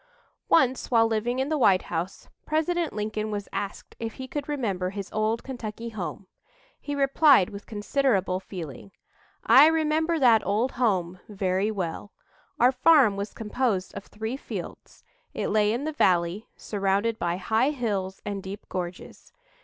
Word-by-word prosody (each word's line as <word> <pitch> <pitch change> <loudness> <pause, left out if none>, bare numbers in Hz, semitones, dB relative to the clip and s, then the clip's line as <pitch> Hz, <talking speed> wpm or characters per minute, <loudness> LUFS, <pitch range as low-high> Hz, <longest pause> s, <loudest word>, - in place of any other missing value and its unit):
Once 260 -5 +3
while 230 -2 +4
living 225 +2 -1
in 265 +2 -1
the 310 -1 0
White 195 -6 +4
House, 175 +3 -5 0.2
President 320 +2 0
Lincoln 215 0 -3
was 205 -1 -4
asked 200 -1 -5
if 225 -1 -4
he 260 - -8
could 290 +2 -5
remember 200 -11 -1
his 200 0 -7
"old 215 +2 0
Kentucky 235 -3 -6
home." 200 -2 -6 0.5
He 290 - -4
replied 275 - +4
with 200 0 -9
considerable 205 -4 0
feeling: 180 -2 -9 0.5
"I 285 +3 +8
remember 320 +1 +1
that 240 -6 +5
old 230 +6 0
home 185 -7 0
very 195 0 0
well. 195 -1 -4 0.5
Our 245 +2 +6
farm 260 -4 +5
was 200 +1 -5
composed 215 -3 -1
of - - -8
three 220 +4 -5
fields. - - -8 0.3
It - - -2
lay 210 -1 +3
in 240 +5 -2
the 310 +1 -3
valley, 180 - +1
surrounded 200 +2 -1
by 175 0 -1
high 220 +7 +1
hills 205 -9 -3
and 200 -1 -3
deep 195 +2 -8
gorges. 180 -1 -6
215 Hz, 155 wpm, -26 LUFS, 195-260 Hz, 0.5 s, I